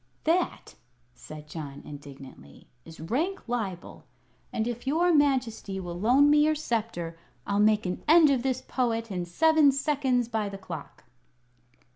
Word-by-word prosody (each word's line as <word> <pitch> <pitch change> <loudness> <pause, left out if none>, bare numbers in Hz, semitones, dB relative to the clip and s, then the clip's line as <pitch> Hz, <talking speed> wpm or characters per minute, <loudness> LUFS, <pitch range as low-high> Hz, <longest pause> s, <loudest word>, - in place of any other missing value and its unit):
"That," 340 +3 0 0.4
said 150 +3 -11
John, 150 -3 -8
indignantly, 135 - -12 0.2
"is 165 0 -13
rank 280 - -2
libel; 205 -7 -5 0.5
and 220 +1 -2
if 240 +2 -5
your 340 +5 +2
Majesty 255 -9 +1
will 175 -2 -6
loan 255 +8 +4
me 295 0 +5
your 310 0 +2
sceptre, 220 - -3 0.3
I'll 200 0 0
make 215 0 +3
an 180 0 -4
end 315 -1 +7
of 260 -3 +1
this 255 0 -2
Poet 230 -3 -2
in 180 -2 -3
seven 310 - +4
seconds 270 -4 0
by 220 -3 -2
the 195 - -7
clock." 160 -6 -9
230 Hz, 145 wpm, -27 LUFS, 175-280 Hz, 0.5 s, end